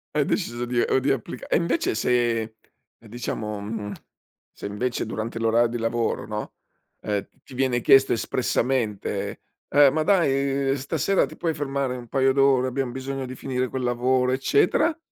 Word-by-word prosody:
Hai - - +3
deciso 120 +1 -2
di 120 0 -1
o 130 - +2
di 140 +2 +1
applica 125 -1 -4
e - - +3
invece, 165 -1 0
se 115 -1 0 0.4
diciamo 110 -2 -5
mhmm, 105 0 -5 0.6
se - - -10
invece 115 +5 -2
durante 110 +1 -4
l'orar 115 +1 +3
di 120 - -3
lavoro, 115 -1 -1
no, 105 0 -5 0.5
ehm, 105 -2 -2 0.2
ti 130 - -14
viene 125 -2 0
chiesto 135 +1 +6
espressamente: 120 -3 -1 0.3
"Eh, 145 0 +6
ma 155 - 0
dai 140 -6 +2
stasera 140 +8 +1
ti - - -11
puoi 165 -2 -1
fermare 135 -3 -2
un 120 - -10
paio 135 +2 +2
d'ore, 135 -2 +4
abbiam 130 -1 -2
bisogno 135 +1 -4
di 130 +1 -7
finire 130 -1 -2
quel 130 +1 -4
lavoro, 125 +1 +1
eccetera." 145 - +2
125 Hz, 160 wpm, -24 LUFS, 115-135 Hz, 0.6 s, chiesto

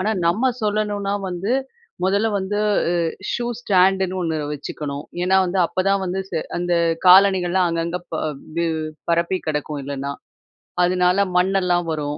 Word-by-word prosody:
ஆனா 210 +4 0 0.2
நம்ம 225 +10 +2
சொல்லணுனா 205 -1 -1
வந்து, 180 +4 -3 0.5
முதல்ல 200 +4 +2
வந்து 195 +2 -2 0.3
உ - - +1 0.4
ஷூ 240 - -2 0.2
ஸ்டாண்டுன்னு 190 -2 +2
ஒண்ணு 165 -2 -1 0.2
வச்சுக்கணும். 145 0 -5 0.2
ஏன்னா 185 +1 +3
வந்து 185 +1 -1
அப்பதான் 195 +3 0
வந்து 185 +1 -2
செ - - -1 0.2
அந்த 175 0 0 0.3
காலணிகள்லாம் 185 -1 +5
அங்கங்க 170 +1 -2
ப - - -2 0.4
வு 170 - +1 0.4
பரப்பிக் 170 +2 0
கிடக்கும் 150 -1 -2
இல்லனா. 140 0 -4 0.7
அதுனால 180 +2 +3
மண்ணெல்லாம் 180 -1 +2
வரும். 150 -1 -3
180 Hz, 135 wpm, -21 LUFS, 170-195 Hz, 0.7 s, காலணிகள்லாம்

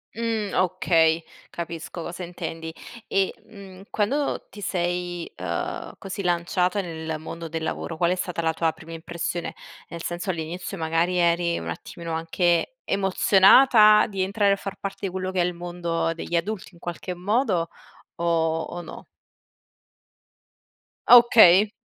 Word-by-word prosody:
Mh, 225 -3 -2
okay 165 -3 +2 0.3
capisco 170 0 -6
cosa 175 +2 -7
intendi 165 -2 -6 0.4
e, 195 -1 +1
mhmm, 195 -3 -12
quando 275 +8 -1
ti 205 - -11
sei, 175 -2 -2
uhm, 85 -2 -4
così 195 +1 -6
lanciata 180 +2 0
nel 160 -2 -5
mondo 165 +1 -7
del 160 0 -4
lavoro, 160 0 -4
qual 170 +1 +2
è 185 - +2
stata 180 -2 -3
la 160 0 +1
tua 165 0 +1
prima 160 +1 -13
impressione? 170 +1 -4 0.3
Nel 170 0 -7
senso, 175 +2 -4
all'inizio 175 +3 -4
magari 165 +2 0
eri 170 0 +2
un - - -5
attimino 170 -2 -6
anche 170 - 0
emozionata 210 +3 +6
di 195 -4 -4
entrare 200 +1 +2
a - - +2
far 195 0 -7
parte 195 0 -4
di - - -6
quello 185 0 -3
che 185 - +1
è - - +3
il 180 - -2
mondo 170 -1 -2
degli 170 +1 -5
adulti 190 +4 -2
in - - -18
qualche 175 +1 -5
modo 190 -3 0 0.5
o 165 -1 +1
o 175 +2 -6
no? - - -10 2.0
Okay. 215 -5 +8
175 Hz, 145 wpm, -24 LUFS, 165-195 Hz, 2.0 s, Okay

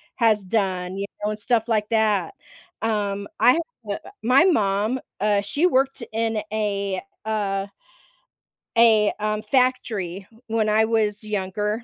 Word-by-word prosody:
has 220 -4 +3
done, 185 -2 -1
you 200 - -2 0.2
know, 210 - +1
and 215 - -5
stuff 230 +1 0
like 215 -2 +1
that. 220 - +1 0.5
Um, 205 -2 -1
I 245 +3 +6
ha 335 - +1 0.3
uh, - - -3 0.3
my 255 +6 +5
mom, 215 - +2 0.2
uh, 205 -1 +3
she 285 - 0
worked 270 -4 +1
in 225 -1 -1
a, 200 -3 -1 0.2
uh 200 -2 -1 1.1
a, 220 -3 +5
um, 215 0 -1
factory 215 -6 0 0.2
when 220 -1 +1
I 220 +1 +4
was 215 -2 0
younger. 210 +2 -2
215 Hz, 135 wpm, -23 LUFS, 200-225 Hz, 1.1 s, I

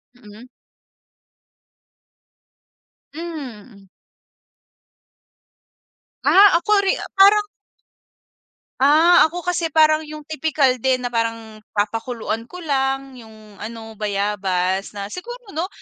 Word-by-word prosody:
Mm. 225 +1 -15 2.7
Hmm. 255 - -9 2.4
Ah, 400 +1 +7
ako 400 +3 +2
ri 385 - +2 0.2
parang 415 +2 +5 1.3
Ah, 315 +5 +5
ako 350 +2 -7
kasi 350 -2 -1
parang 310 0 +3
yung 305 0 -9
tipikal 305 -3 +1
din 255 0 0
na 245 - -3
parang 225 -1 -3 0.2
papakuluan 225 +2 -3
ko 360 -1 -10
lang 270 -2 -1
yung 215 -2 -16
ano, 225 0 -8
bayabas 195 -2 -2
na 200 +1 -6
siguro 480 +3 -9
'no, 330 +4 -3
265 Hz, 90 wpm, -20 LUFS, 215-325 Hz, 2.7 s, Ah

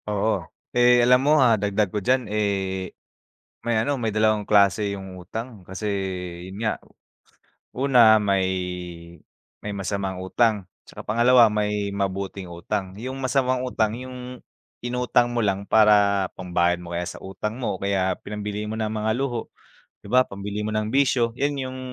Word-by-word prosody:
Oo. 105 +1 0 0.3
Eh, 120 0 +5
alam 125 +1 +5
mo, 145 +3 +3
ah, 115 -4 +3
dagdag 105 -1 0
ko 105 - -1
diyan, 125 +4 +1
eh, 100 -3 -2 0.7
may 120 -1 -1
ano, 135 +4 0
may 115 - -1
dalawang 110 -1 +2
klase 100 0 +3
yung 95 -1 -9
utang. 110 +5 -7
Kasi 95 +3 -7 0.6
yun 95 - -9
nga, 110 - -1 1.0
una 125 -4 +6
may 100 -3 +1 1.1
may 105 -1 -5
masamang 95 -1 -3
utang 105 +2 +1 0.2
'tsaka - - -10
pangalawa, 120 +1 +5
may 105 -1 -1
mabuting 95 -1 -3
utang. 95 +2 -4
Yung 130 +5 -6
masamang 130 -1 +1
utang 110 -3 0
yung 125 -1 -8 0.4
inutang 125 0 +1
mo 120 -1 -1
lang 100 0 -1
para 100 -3 +4
pambayad 90 -1 +1
mo 85 0 -7
kaya 90 - -2
sa - - -7
utang 105 +4 -5
mo 120 - -2
o - - -15
kaya 95 -2 +1
pinambili 105 0 -4
mo 110 +1 -4
ng 110 -1 -1
mga 110 0 -1
luho, 125 -4 -3 0.5
'di 100 - -10
ba? 130 0 +5
Pambili 100 +1 -5
mo - - -2
ng 110 0 -1
bisyo. 125 -4 +2
Yun 145 +1 0
yung 130 -1 -5
105 Hz, 160 wpm, -24 LUFS, 100-120 Hz, 1.1 s, una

